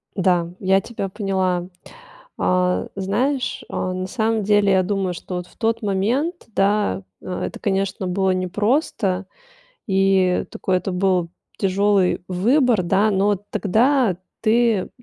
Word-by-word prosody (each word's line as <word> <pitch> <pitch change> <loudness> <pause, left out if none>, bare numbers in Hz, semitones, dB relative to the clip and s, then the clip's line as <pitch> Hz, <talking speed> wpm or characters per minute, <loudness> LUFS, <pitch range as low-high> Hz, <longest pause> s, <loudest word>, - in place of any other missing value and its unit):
Да, 180 -3 +2
я 190 0 +3
тебя 200 -3 -5
поняла. 185 -3 -1 0.7
Э, 180 0 +1
знаешь, 245 +8 -1
э, - - -7
на 185 0 -2
самом 220 0 0
деле 205 -1 +3
я 190 -1 +4
думаю, 190 -2 -1
что 180 +1 -7
вот 180 0 -4
в - - -23
тот 230 0 0
момент, 235 - -1
да, 195 - +1 0.2
это, 180 -1 -5
конечно, 195 -1 -1
было 190 +1 +1
непросто 195 - 0 0.6
и 190 -2 +2
такой 185 -1 -1
это 180 +2 -3
был 180 -2 +1 0.3
тяжелый 195 -1 +2
выбор, 230 +4 +2
да, 195 +5 +2
но 200 +1 +2 0.2
тогда 225 0 +2 0.2
ты 225 -3 +2
195 Hz, 130 wpm, -21 LUFS, 185-215 Hz, 0.7 s, я